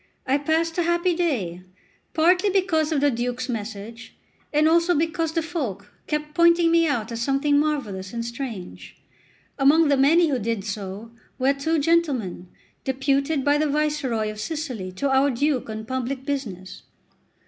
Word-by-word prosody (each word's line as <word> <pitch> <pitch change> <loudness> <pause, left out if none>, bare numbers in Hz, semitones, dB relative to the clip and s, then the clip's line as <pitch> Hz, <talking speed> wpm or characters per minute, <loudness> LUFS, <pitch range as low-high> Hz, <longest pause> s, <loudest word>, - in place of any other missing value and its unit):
I 270 +2 +2
passed 325 +3 0
a - - +4
happy 345 +1 +1
day, 225 - -1 0.5
partly 360 +5 +4
because 360 -5 +1
of 295 -3 +1
the 290 0 +3
Duke's 245 +1 -3
message, 225 0 -6 0.4
and 305 +1 +3
also 340 +2 +3
because 325 +1 0
the 330 -1 0
folk 225 - -5
kept 300 0 -3
pointing 340 +1 +4
me 335 0 +4
out 235 -6 -1
as 230 0 -4
something 280 +3 +2
marvellous 225 -12 -2
and 235 -1 -4
strange. 235 -6 -7 0.6
Among 295 +3 +5
the 280 - +3
many 320 +5 +4
who 265 -3 0
did 225 -2 -2
so, 205 +1 -6 0.3
were 265 +2 +2
two 315 +4 -1
gentlemen, 285 - 0 0.4
deputed 275 +2 0
by 290 +1 +3
the 305 -1 +1
Viceroy 280 -7 0
of 215 - -10
Sicily 250 - -4
to 275 +9 -1
our 270 +1 +4
Duke 270 -1 0
on 220 0 -5
public 260 +2 -3
business. 210 -11 -5
275 Hz, 160 wpm, -24 LUFS, 230-320 Hz, 0.6 s, Among